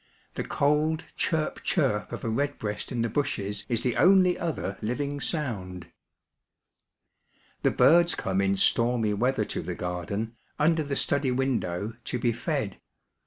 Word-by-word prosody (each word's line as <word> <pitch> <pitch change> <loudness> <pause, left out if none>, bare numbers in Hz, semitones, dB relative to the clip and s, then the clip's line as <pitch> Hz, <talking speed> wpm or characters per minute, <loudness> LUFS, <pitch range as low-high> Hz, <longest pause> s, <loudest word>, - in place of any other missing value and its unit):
The - - -3
cold 155 +3 +1
chirp, 160 -2 -1
chirp 130 - 0
of - - -6
a 115 - -1
redbreast 110 -4 -2
in 120 -2 -1
the - - +1
bushes 105 -6 -2
is 120 -2 +1
the 125 -2 -1
only 185 -1 +5
other 155 - -3
Uving 140 +6 -2
sound. 95 - -3 1.7
The - - +3
birds 170 +1 +5
come 95 0 -1
in 100 0 +2
stormy 115 +1 +3
weather 125 +6 +1
to - - -3
the - - -5
garden, 100 +6 -4 0.2
under 160 +2 +3
the 140 -2 -3
study 140 -1 +2
window, 115 -6 -1
to - - -2
be 120 0 +1
fed. 120 - -3
125 Hz, 145 wpm, -27 LUFS, 105-145 Hz, 1.7 s, only